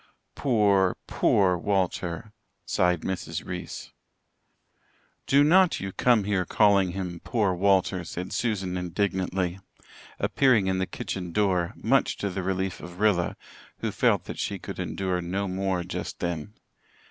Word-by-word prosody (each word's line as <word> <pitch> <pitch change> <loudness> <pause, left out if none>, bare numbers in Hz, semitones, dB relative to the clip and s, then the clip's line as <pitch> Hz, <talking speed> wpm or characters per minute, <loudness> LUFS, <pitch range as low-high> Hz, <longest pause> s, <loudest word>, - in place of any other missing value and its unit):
"Pore, 100 -7 +2
pore 90 -3 +2
Walter," 95 0 -1 0.3
sighed 90 -2 +1
Mrs. 95 -1 -4
Reese. 90 -2 -6 1.4
"Do 140 +1 +5
not 180 +3 +5
you 95 0 -4
come 120 +1 +3
here 100 -2 0
calling 100 -3 +3
him 90 -3 -4
poor 105 -6 +1
Walter," 95 -1 +2
said 90 +2 -6
Susan 95 -6 -1
indignantly, 90 0 -1 0.6
appearing 125 -8 +3
in 95 0 0
the 95 - -1
kitchen 90 -2 -5
door, 90 -3 +1
much - - +1
to 100 - -2
the 95 +1 -3
relief 95 0 -2
of 85 +1 -10
Rilla, 100 -5 +2 0.4
who - - -1
felt - - +2
that - - -7
she - - -2
could - - -8
endure 95 -2 -2
no 95 +3 -2
more 95 -1 -1
just 90 - -5
then. 85 +3 -4
95 Hz, 135 wpm, -26 LUFS, 90-100 Hz, 1.4 s, Do